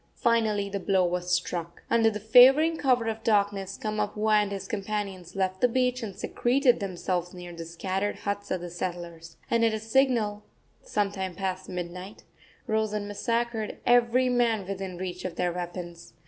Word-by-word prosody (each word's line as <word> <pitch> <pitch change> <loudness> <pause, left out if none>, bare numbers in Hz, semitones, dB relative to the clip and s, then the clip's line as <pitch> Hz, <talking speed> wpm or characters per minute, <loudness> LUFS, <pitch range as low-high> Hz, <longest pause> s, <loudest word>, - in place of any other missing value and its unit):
Finally 220 -4 +2
the 200 0 -3
blow 190 -1 +2
was 180 0 -2
struck. 175 -1 -2
Under 230 -1 +4
the 210 -1 -4
favoring 260 +9 +7
cover 255 -6 +2
of 225 0 -3
darkness 200 -3 +1
Kamapuaa 215 0 +1
and 205 -1 -2
his 195 -1 -5
companions 200 -4 -4
left 190 -1 -1
the 250 - +6
beach 250 +1 0
and 205 -4 -5
secreted 250 0 +2
themselves 180 -2 -3
near 175 -1 -8
the 165 0 -7
scattered 190 +4 -2
huts 205 0 -4
of 185 - -1
the 175 -1 -7
settlers, 170 -2 -6
and 230 0 +3
at 225 -1 +3
a - - -3
signal, 220 -3 +1 0.4
some 205 -1 -1
time 190 -2 -4
past 190 0 -3
midnight, 180 +2 -6 0.4
rose 220 -2 0
and 205 -1 -2
massacred 230 +1 -2
every 245 +1 +4
man 235 -5 +1
within 195 -2 -5
reach 180 0 -5
of 180 -2 -4
their 175 0 0
weapons. 175 -1 -7
200 Hz, 170 wpm, -27 LUFS, 180-225 Hz, 0.4 s, favoring